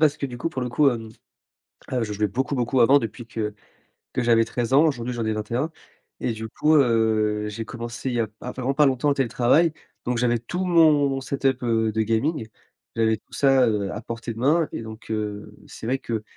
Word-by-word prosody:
parce 150 -2 +4
que - - -4
du 125 -3 -5
coup, 165 - -1
pour 130 -5 -4
le 125 - -3
coup 145 +3 +4
hem, 115 -3 -3 0.8
heu, 125 -3 0
je 105 - -4
jouais 105 +1 0
beaucoup, 130 +7 -2
beaucoup 125 0 +1
avant 135 +5 +6
depuis 115 0 -6
que 105 -1 -4 0.6
que 125 - 0
j'avais 115 -1 +4
13 120 0 -3
ans. 145 +4 +6
Aujourd'hui, 125 -5 -2
j'en 120 -2 -3
ai 110 - +1
21 120 +9 -2 0.5
et 120 - -1
du 110 0 -6
coup 155 +7 +2
heu, 110 -4 +2
j'ai 110 +1 -5
commencé 120 +2 -5
il 125 - -2
y 120 - +1
a 110 - 0
p 105 - -31
il - - -12
y - - -3
a - - -4
vraiment 130 +1 -2
pas 150 +1 +4
longtemps 135 +2 +2
le - - +2
télétravail, 135 +5 +3 0.3
donc 125 0 0
j'avais 120 0 +2
tout 175 +11 -4
mon 150 -6 +4
set 135 +1 -5
up 135 -2 +2
heu, 110 -2 +1
de 110 - -1
gaming. 115 +4 0 0.5
J'avais 110 -1 +2
tout - - -37
ça, 135 -2 +4
heu, 105 -3 -1
à 105 - -5
portée 115 0 -6
de 110 - -11
main 150 +5 +2
et - - -4
donc, 110 0 -10
heu, 105 -1 -4
c'est - - -11
vrai 130 +3 0
que 115 -4 -4
120 Hz, 240 wpm, -24 LUFS, 110-135 Hz, 0.8 s, avant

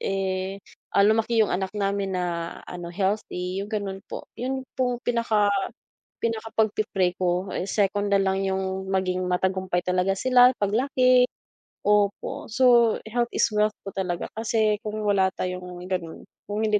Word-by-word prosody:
eh, 195 0 -2 0.3
ah, - - +4
lumaki 225 +2 +3
'yung 215 - +4
anak 190 +1 -2
namin 200 -1 -1
na, 170 -2 -3
ano 175 -1 -6
healthy 190 -1 -2
'yung 200 - -5
ganun 200 -2 -3
po, - - -8
'yun 265 +2 -2 0.2
pong 250 -2 0
pinaka 225 -4 +2 0.7
pinaka 225 -1 -2
pagpi-pray 205 -4 +1
ko 180 +1 0
eh, 185 - -2
second 205 0 +1
nalang 195 -1 +2
'yung 190 0 -2
maging 185 -1 0
matagumpay 185 0 0
talaga 185 +1 +1
sila 250 +1 +6
paglaki, 250 +4 +3 0.6
opo, 205 +1 +1
so 240 -1 +5
health 240 +1 0
is - - +3
wealth 210 0 +2
po 195 - -6
talaga, 180 -3 -2
kasi 220 -2 +1
kung 215 0 -4
wala 195 -2 +3
tayong 180 -1 -5
ganun, 170 -3 -4 0.2
kung 215 +2 0
hindi 210 -1 +2
200 Hz, 145 wpm, -25 LUFS, 185-220 Hz, 0.7 s, sila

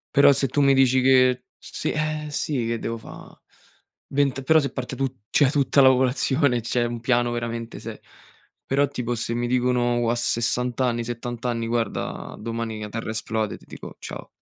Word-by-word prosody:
Però 140 0 +7
se 140 0 +1
tu 145 - 0
mi 140 -1 +5
dici 130 -1 +4
che 130 -1 +4
s - - -14
sì, - - -2
eh 155 0 -2
sì, 140 -5 -2
che 115 0 -1
devo 115 +1 -4
fa' - - -12 0.7
vent 140 -1 0
però 160 +4 +5
se 140 - -2
parte 130 -2 -5
tu 135 - 0 0.2
cioè 145 -3 +4
tutta 140 -1 +3
la 130 - +7
popolazione, 130 0 +2
c'è 120 +2 0
un 120 0 -4
piano 120 0 +1
veramente 115 -1 -4
se - - -8 0.7
Però 140 +1 +2
tipo 125 -3 -3
se 115 0 -3
mi 120 +1 -1
dicono 125 -1 +1
u 120 - 0
a 120 - +2
60 120 +1 -1
anni, 120 -2 +1
70 120 0 -5
anni: 115 -1 -1
"Guarda 115 -3 -3
domani 115 0 -4
la 105 - -5
terra 115 +1 -5
esplode", 110 -1 -2
ti - - -20
dico: - - -10
"Ciao". - - -8
125 Hz, 190 wpm, -24 LUFS, 115-135 Hz, 0.7 s, Però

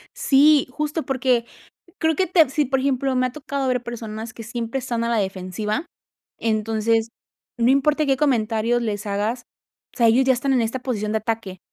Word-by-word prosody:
Sí, 300 - +4
justo, 300 +4 -3
porque 255 -3 +1 0.5
creo 320 0 +2
que 375 +5 +1
tepsi 310 -5 +3
por 265 0 0
ejemplo, 270 0 0
me 255 0 +2
ha 250 - -5
tocado 280 -1 -3
ver 250 -1 0
personas 225 -1 -6
que 230 - -8
siempre 230 +2 -4
están 235 -3 -2
a - - -1
la 235 -1 +1
defensiva. 200 - -3 0.5
Entonces, 225 0 0 0.5
no 235 +1 +3
importa 295 +3 +2
qué 270 -1 +2
comentarios 240 -3 +1
les 210 -2 -3
hagas, 210 +5 -2 0.5
o - - -22
sea, 235 - +5
ellos 235 +4 +4
ya 260 - +4
están 270 +2 0
en 255 - +3
esta 230 +3 -2
posición 215 -5 -2
de 220 - +2
ataque. 215 -4 -4
240 Hz, 185 wpm, -22 LUFS, 220-270 Hz, 0.5 s, sea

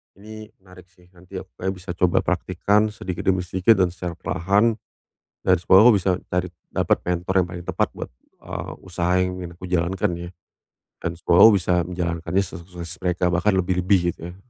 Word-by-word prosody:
Ini 110 +2 -11 0.2
menarik 90 -1 -17
sih 90 -1 -24
nanti 90 +1 -9
aku - - -11
kayaknya 95 +1 -2
bisa 90 0 -14
coba 90 0 +2
praktikkan 105 +1 +1
sedikit 90 -4 -6
demi 95 -1 +2
sedikit 95 +4 +2
dan 90 - +4
secara 90 0 -5
perlahan, 100 +6 +1 0.7
dan 90 - +4
semoga 95 +6 +6
aku - - +6
bisa 95 0 +1 0.2
cari 90 0 0 0.2
dapat - - +1
mentor 90 +1 -2
yang - - -6
paling 85 -1 -8
tepat - - 0
buat, - - -7 0.3
eee, - - -6
usaha 90 -1 -2
yang 90 0 +1
ingin 85 -1 -7
aku 95 - -8
jalankan 90 +2 0
ya, 85 0 -7 0.7
dan 85 - -1
semoga 85 0 +4 0.2
bisa 90 0 0
menjalankannya 85 +1 -1
sesukses 85 -2 -9
mereka 90 0 0
bahkan 95 +4 +2
lebih-lebih 90 -1 +1
gitu 85 - -9
ya. - - -12
90 Hz, 180 wpm, -23 LUFS, 85-95 Hz, 0.7 s, semoga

